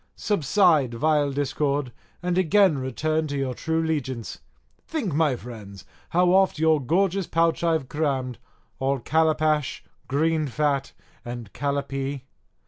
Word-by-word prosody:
Subside, 165 Hz, -, +2 dB
vile 150 Hz, +2 st, +2 dB
discord, 140 Hz, -1 st, -1 dB, 0.3 s
and 180 Hz, 0 st, 0 dB
again 185 Hz, -3 st, +4 dB
return 155 Hz, +5 st, -1 dB
to 145 Hz, -1 st, -3 dB
your 135 Hz, -2 st, -1 dB
true 160 Hz, +5 st, -1 dB
'legiance. 130 Hz, -7 st, -3 dB, 0.5 s
Think, 250 Hz, -, -2 dB
my 150 Hz, -3 st, +2 dB
friends, 105 Hz, -6 st, -10 dB, 0.2 s
how 180 Hz, +1 st, +3 dB
oft 190 Hz, -2 st, +3 dB
your 160 Hz, -1 st, +3 dB
gorgeous 185 Hz, +6 st, +1 dB
pouch 165 Hz, +1 st, +1 dB
I've 160 Hz, -5 st, +1 dB
crammed, 135 Hz, -5 st, -2 dB, 0.4 s
all 135 Hz, +1 st, +1 dB
calapash, 155 Hz, +1 st, +1 dB, 0.2 s
green 155 Hz, +3 st, +1 dB
fat, 140 Hz, +1 st, 0 dB, 0.3 s
and 120 Hz, -3 st, -7 dB
calapee. 140 Hz, -1 st, -3 dB
150 Hz, 125 wpm, -25 LUFS, 135-160 Hz, 0.5 s, again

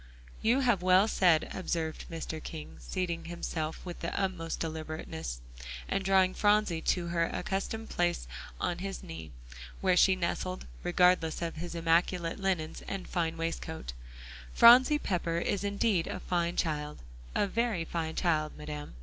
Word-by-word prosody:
"You 240 Hz, +5 st, +3 dB
have 240 Hz, -8 st, +3 dB
well 185 Hz, +3 st, +5 dB
said," 175 Hz, -7 st, +3 dB
observed 165 Hz, -4 st, -3 dB
Mr. 160 Hz, -1 st, -5 dB
King, 155 Hz, -2 st, -8 dB
seating 170 Hz, -3 st, -3 dB
himself 165 Hz, -2 st, -4 dB
with 175 Hz, -1 st, -6 dB
the 170 Hz, -, -3 dB
utmost 180 Hz, -4 st, -2 dB
deliberateness, 155 Hz, -, -5 dB, 0.5 s
and 195 Hz, -, -1 dB
drawing 190 Hz, -1 st, +4 dB
Phronsie 205 Hz, -5 st, +2 dB
to 175 Hz, 0 st, 0 dB
her 170 Hz, -1 st, +2 dB
accustomed 210 Hz, +5 st, -3 dB
place 175 Hz, -, 0 dB, 0.3 s
on 175 Hz, 0 st, -1 dB
his 195 Hz, +1 st, -5 dB
knee, 80 Hz, -1 st, -8 dB, 0.5 s
where 185 Hz, -1 st, +3 dB
she 190 Hz, +1 st, +6 dB
nestled, 185 Hz, +1 st, -2 dB, 0.2 s
regardless 175 Hz, -2 st, +3 dB
of 165 Hz, -1 st, -4 dB
his 175 Hz, +2 st, -5 dB
immaculate 170 Hz, +1 st, +1 dB
linen 185 Hz, -5 st, -1 dB
and 195 Hz, -2 st, -4 dB
fine 165 Hz, -2 st, -1 dB
waistcoat, 165 Hz, -, -4 dB, 0.6 s
"Phronsie 255 Hz, +5 st, +8 dB
Pepper 175 Hz, -, -1 dB
is 200 Hz, +3 st, -1 dB
indeed 200 Hz, -3 st, +1 dB
a -, -, -4 dB
fine 175 Hz, -1 st, -1 dB
child; 150 Hz, -, -2 dB, 0.3 s
a -, -, +3 dB
very 215 Hz, -4 st, 0 dB
fine 160 Hz, -1 st, -3 dB
child, 155 Hz, -4 st, 0 dB
Madam." 150 Hz, -, -7 dB
175 Hz, 145 wpm, -31 LUFS, 160-190 Hz, 0.6 s, Phronsie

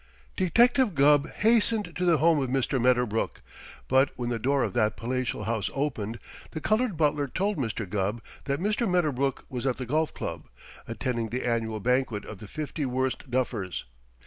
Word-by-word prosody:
Detective 235 Hz, +3 st, +3 dB
Gubb 145 Hz, +1 st, +5 dB
hastened 225 Hz, -1 st, +2 dB
to 180 Hz, -, -1 dB
the 170 Hz, -2 st, +5 dB
home 160 Hz, -1 st, +4 dB
of 130 Hz, -, -1 dB
Mr. 135 Hz, 0 st, 0 dB
Medderbrook, 125 Hz, -3 st, +1 dB, 0.5 s
but 135 Hz, +1 st, +4 dB
when 120 Hz, -1 st, -3 dB
the 115 Hz, -, -1 dB
door 135 Hz, +3 st, +2 dB
of -, -, -2 dB
that 110 Hz, -3 st, +1 dB
palatial 125 Hz, -2 st, -2 dB
house 110 Hz, -2 st, -1 dB
opened, 120 Hz, -6 st, -2 dB, 0.4 s
the 155 Hz, -, -3 dB
colored 215 Hz, +2 st, +1 dB
butler 150 Hz, -2 st, +2 dB
told 195 Hz, +9 st, -1 dB
Mr. 115 Hz, -4 st, -2 dB
Gubb 100 Hz, +4 st, -1 dB, 0.3 s
that 140 Hz, -1 st, -1 dB
Mr. 210 Hz, +3 st, 0 dB
Medderbrook 140 Hz, -7 st, 0 dB
was 125 Hz, +1 st, -3 dB
at 130 Hz, -, +1 dB
the 130 Hz, -, -5 dB
Golf 155 Hz, +5 st, 0 dB
Club, -, -, -6 dB, 0.4 s
attending 120 Hz, -3 st, -2 dB
the 125 Hz, +3 st, -3 dB
annual 115 Hz, -2 st, -1 dB
banquet 125 Hz, -1 st, 0 dB
of 110 Hz, -, -9 dB
the 105 Hz, -, -9 dB
Fifty 155 Hz, +4 st, -4 dB
Worst 130 Hz, +1 st, -2 dB
Duffers. 120 Hz, -7 st, -2 dB
130 Hz, 170 wpm, -27 LUFS, 120-155 Hz, 0.5 s, Gubb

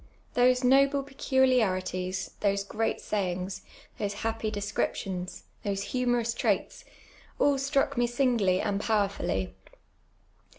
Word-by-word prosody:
Those 250 Hz, +1 st, +4 dB
noble 275 Hz, +2 st, +4 dB
peculiarities, 215 Hz, -10 st, +1 dB
those 200 Hz, -1 st, +1 dB
great 220 Hz, +2 st, -1 dB
sayings, 185 Hz, -2 st, -2 dB, 0.4 s
those 205 Hz, -1 st, -1 dB
happy 225 Hz, -1 st, -1 dB
descriptions, 195 Hz, -3 st, -3 dB, 0.2 s
those 200 Hz, -1 st, -2 dB
humorous 245 Hz, -2 st, +1 dB
traits -, -, -1 dB, 0.3 s
— -, -, -26 dB
all 280 Hz, -1 st, +3 dB
struck 275 Hz, -2 st, +1 dB
me 240 Hz, -, +3 dB
singly 235 Hz, -7 st, +2 dB
and 200 Hz, 0 st, -1 dB
powerfully. 200 Hz, -, 0 dB
220 Hz, 110 wpm, -28 LUFS, 195-255 Hz, 0.4 s, Those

